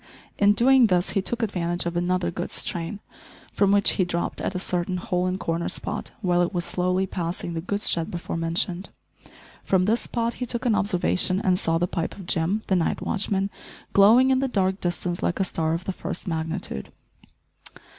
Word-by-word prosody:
In 205 Hz, 0 st, +6 dB
doing 250 Hz, +2 st, +5 dB
this 180 Hz, -2 st, +1 dB
he 195 Hz, -, +1 dB
took 235 Hz, +4 st, -1 dB
advantage 175 Hz, -4 st, -1 dB
of 170 Hz, 0 st, -2 dB
another 175 Hz, 0 st, 0 dB
goods -, -, -3 dB
train, 175 Hz, +4 st, -4 dB, 0.5 s
from 200 Hz, -1 st, +3 dB
which 200 Hz, 0 st, +5 dB
he 185 Hz, -, +1 dB
dropped 175 Hz, -1 st, -2 dB
at 190 Hz, -, -2 dB
a -, -, +1 dB
certain 180 Hz, 0 st, -1 dB
hole 180 Hz, 0 st, -1 dB
and 185 Hz, +1 st, -2 dB
corner 165 Hz, +1 st, -2 dB
spot, -, -, -3 dB
while 175 Hz, -1 st, +3 dB
it 175 Hz, +2 st, -1 dB
was 175 Hz, -1 st, -1 dB
slowly 180 Hz, +1 st, 0 dB
passing 170 Hz, -1 st, -4 dB
the 165 Hz, -, -3 dB
goods 200 Hz, +4 st, -1 dB
shed 165 Hz, -1 st, +1 dB
before 175 Hz, -1 st, -5 dB
mentioned. 170 Hz, +3 st, -1 dB, 0.7 s
From 185 Hz, -1 st, +2 dB
this 225 Hz, +4 st, +2 dB
spot 235 Hz, 0 st, -1 dB
he 250 Hz, -, -5 dB
took 235 Hz, 0 st, -3 dB
an 235 Hz, -, +3 dB
observation 185 Hz, -2 st, +1 dB
and 185 Hz, -2 st, +2 dB
saw 165 Hz, 0 st, +1 dB
the 175 Hz, -, +1 dB
pipe 170 Hz, -2 st, -3 dB
of 195 Hz, -, -9 dB
Jim, 185 Hz, +5 st, 0 dB
the 190 Hz, -, +1 dB
night 170 Hz, -3 st, 0 dB
watchman, 195 Hz, -1 st, -1 dB, 0.4 s
glowing 230 Hz, +7 st, +6 dB
in 260 Hz, -, +3 dB
the 270 Hz, -, +1 dB
dark 190 Hz, -5 st, 0 dB
distance 175 Hz, 0 st, -2 dB
like 175 Hz, -, -1 dB
a -, -, +3 dB
star 160 Hz, -3 st, -1 dB
of 170 Hz, -, -6 dB
the 190 Hz, -, -2 dB
first 185 Hz, 0 st, -6 dB
magnitude. 160 Hz, -, -3 dB
185 Hz, 195 wpm, -25 LUFS, 175-200 Hz, 0.7 s, In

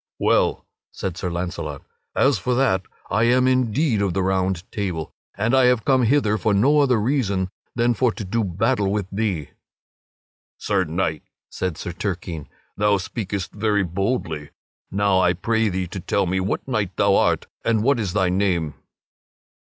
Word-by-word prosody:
"Well," -, -, +2 dB, 0.3 s
said 95 Hz, -3 st, -4 dB
Sir 90 Hz, 0 st, -3 dB
Launcelot, 85 Hz, -4 st, -4 dB, 0.3 s
"as 135 Hz, 0 st, +3 dB
for 125 Hz, -1 st, 0 dB
that, 120 Hz, -8 st, +2 dB, 0.3 s
I 110 Hz, +4 st, +3 dB
am 125 Hz, +2 st, +4 dB
indeed 130 Hz, -1 st, +2 dB
of 95 Hz, -3 st, 0 dB
the 95 Hz, -, +1 dB
Round 95 Hz, -1 st, 0 dB
Table, 90 Hz, -8 st, -3 dB, 0.2 s
and 110 Hz, +5 st, +1 dB
I 130 Hz, -1 st, +5 dB
have 125 Hz, -2 st, +3 dB
come 130 Hz, -1 st, +4 dB
hither 110 Hz, -4 st, +2 dB
for 105 Hz, +3 st, +1 dB
no 140 Hz, +9 st, +4 dB
other 130 Hz, -5 st, +3 dB
reason 105 Hz, -6 st, 0 dB, 0.3 s
than 120 Hz, 0 st, +2 dB
for 125 Hz, +1 st, +2 dB
to -, -, -6 dB
do 115 Hz, +4 st, 0 dB
battle 100 Hz, +2 st, 0 dB
with 105 Hz, -2 st, -1 dB
thee." 95 Hz, -7 st, -2 dB, 1.1 s
"Sir 100 Hz, -3 st, 0 dB
Knight," 80 Hz, -1 st, -1 dB, 0.3 s
said 90 Hz, -4 st, -3 dB
Sir 90 Hz, -, -5 dB
Turquine, 85 Hz, -, -4 dB, 0.3 s
"thou 105 Hz, 0 st, +3 dB
speakest 100 Hz, -1 st, -4 dB
very 105 Hz, -1 st, +1 dB
boldly; 90 Hz, -, -2 dB, 0.4 s
now 100 Hz, -1 st, +2 dB
I 90 Hz, -1 st, +3 dB
pray 110 Hz, +4 st, +1 dB
thee 95 Hz, 0 st, -2 dB
to 95 Hz, -, -5 dB
tell 95 Hz, +2 st, 0 dB
me 95 Hz, +1 st, 0 dB
what 95 Hz, +7 st, -2 dB
knight 105 Hz, -8 st, -2 dB
thou 100 Hz, -1 st, +4 dB
art -, -, +2 dB, 0.2 s
and 110 Hz, -2 st, +2 dB
what 135 Hz, 0 st, +3 dB
is 100 Hz, -5 st, -2 dB
thy 95 Hz, -3 st, +2 dB
name." 90 Hz, -5 st, 0 dB
100 Hz, 170 wpm, -22 LUFS, 90-115 Hz, 1.1 s, I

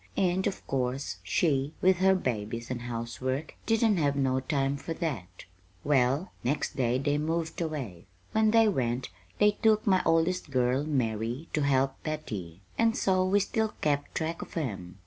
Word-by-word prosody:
And 185 Hz, 0 st, +2 dB
of 200 Hz, -, -4 dB
course 130 Hz, -6 st, -2 dB
she, 140 Hz, -, +1 dB
with 185 Hz, 0 st, +4 dB
her 190 Hz, +1 st, +4 dB
babies 115 Hz, -, -3 dB
and 125 Hz, -1 st, -3 dB
housework, 125 Hz, +4 st, -3 dB
didn't 225 Hz, -2 st, +3 dB
have 145 Hz, -3 st, +2 dB
no 130 Hz, -1 st, +1 dB
time 135 Hz, 0 st, 0 dB
for 140 Hz, +4 st, -5 dB
that. 135 Hz, -, -4 dB, 0.4 s
"Well, 140 Hz, +4 st, +2 dB
next 135 Hz, +5 st, -1 dB
they 125 Hz, -2 st, +1 dB, 0.2 s
moved 160 Hz, +2 st, -2 dB
away. 135 Hz, -, -4 dB, 0.2 s
When 220 Hz, 0 st, +3 dB
they 225 Hz, 0 st, +5 dB
went 125 Hz, -, 0 dB, 0.3 s
they 210 Hz, 0 st, +5 dB
took 215 Hz, 0 st, +2 dB
my 190 Hz, -2 st, +4 dB
oldest 165 Hz, +1 st, +1 dB
girl, 130 Hz, +1 st, +1 dB
Mary, 120 Hz, 0 st, -1 dB
to 155 Hz, -, +1 dB
help 135 Hz, -1 st, +1 dB
Betty; 105 Hz, -, -5 dB, 0.2 s
and 225 Hz, 0 st, +3 dB
so 185 Hz, -1 st, +2 dB
we 190 Hz, +2 st, +3 dB
still 220 Hz, +2 st, -1 dB
kept 145 Hz, -1 st, 0 dB
track 160 Hz, +1 st, -2 dB
of -, -, -8 dB
'em. 95 Hz, -, -4 dB
140 Hz, 160 wpm, -29 LUFS, 125-180 Hz, 0.4 s, they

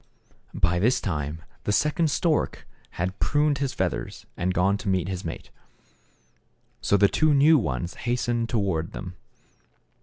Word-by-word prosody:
By 85 Hz, +1 st, +2 dB
this 120 Hz, +6 st, +3 dB
time 80 Hz, -2 st, -3 dB, 0.2 s
the -, -, +1 dB
second 150 Hz, +7 st, +2 dB
stork 155 Hz, +1 st, 0 dB, 0.3 s
had 90 Hz, +3 st, -2 dB
pruned 145 Hz, -1 st, +2 dB
his 140 Hz, -2 st, -1 dB
feathers, 95 Hz, -2 st, -3 dB
and 90 Hz, +2 st, -1 dB
gone 90 Hz, +2 st, +2 dB
to 105 Hz, -, -3 dB
meet 95 Hz, -2 st, +1 dB
his 95 Hz, -1 st, -4 dB
mate. 80 Hz, -, -7 dB, 1.3 s
So 100 Hz, -, +3 dB
the 100 Hz, +1 st, +5 dB
two 155 Hz, +6 st, +2 dB
new 150 Hz, +2 st, +6 dB
ones 75 Hz, -, -3 dB
hastened 120 Hz, -1 st, -1 dB
toward 95 Hz, -8 st, -1 dB
them. 90 Hz, -2 st, -7 dB
100 Hz, 145 wpm, -25 LUFS, 90-135 Hz, 1.3 s, new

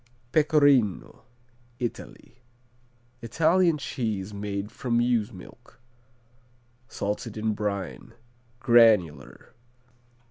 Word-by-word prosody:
Pecorino 145 Hz, -, +2 dB, 0.5 s
Italy 120 Hz, +1 st, -7 dB, 0.8 s
Italian 165 Hz, +7 st, +2 dB
cheese 110 Hz, -8 st, -4 dB
made 100 Hz, 0 st, -5 dB
from 120 Hz, -2 st, -1 dB
ewe's 120 Hz, -2 st, 0 dB
milk. 115 Hz, +6 st, -15 dB, 1.1 s
Salted 105 Hz, +2 st, -5 dB
in 110 Hz, 0 st, -1 dB
brine. 105 Hz, +2 st, -5 dB, 0.5 s
Granular. 110 Hz, -, +2 dB
115 Hz, 70 wpm, -26 LUFS, 105-125 Hz, 1.1 s, Pecorino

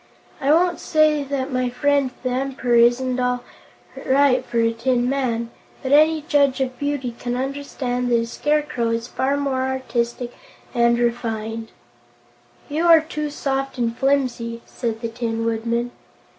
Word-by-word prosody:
I 275 Hz, +2 st, +2 dB
won't 345 Hz, +2 st, +3 dB
say 310 Hz, -2 st, +3 dB
that 275 Hz, -1 st, -3 dB
my 255 Hz, 0 st, +1 dB
friend 280 Hz, +2 st, +1 dB
the 255 Hz, -, 0 dB
Emperor 255 Hz, -1 st, -1 dB
isn't 245 Hz, +2 st, +4 dB
all 250 Hz, 0 st, 0 dB, 0.6 s
right 265 Hz, -1 st, +3 dB
for 235 Hz, -, -4 dB
a 230 Hz, 0 st, +2 dB
tin 245 Hz, +1 st, +1 dB
man, 240 Hz, -4 st, -1 dB, 0.3 s
but 260 Hz, -, -2 dB
any 310 Hz, +1 st, +5 dB
judge 285 Hz, -4 st, +2 dB
of 255 Hz, -1 st, -2 dB
beauty 285 Hz, -4 st, -2 dB
can 245 Hz, 0 st, -3 dB
understand 255 Hz, -2 st, -3 dB
that 240 Hz, -, +3 dB
a 230 Hz, -, -1 dB
Scarecrow 295 Hz, -2 st, 0 dB
is 230 Hz, +1 st, -2 dB
far 275 Hz, +3 st, 0 dB
more 275 Hz, -2 st, -1 dB
artistic 250 Hz, -2 st, -2 dB, 0.4 s
and 235 Hz, 0 st, +3 dB
refined." 225 Hz, -2 st, -2 dB, 1.0 s
"You 315 Hz, +4 st, 0 dB
are 330 Hz, -2 st, +8 dB
too 300 Hz, -1 st, -4 dB
soft 270 Hz, -2 st, -2 dB
and 235 Hz, -1 st, -1 dB
flimsy," 245 Hz, -4 st, 0 dB
said 230 Hz, -2 st, -4 dB
the 230 Hz, -, -2 dB
Tin 225 Hz, 0 st, -3 dB
Woodman. 230 Hz, +1 st, -1 dB
255 Hz, 150 wpm, -22 LUFS, 235-280 Hz, 1.0 s, are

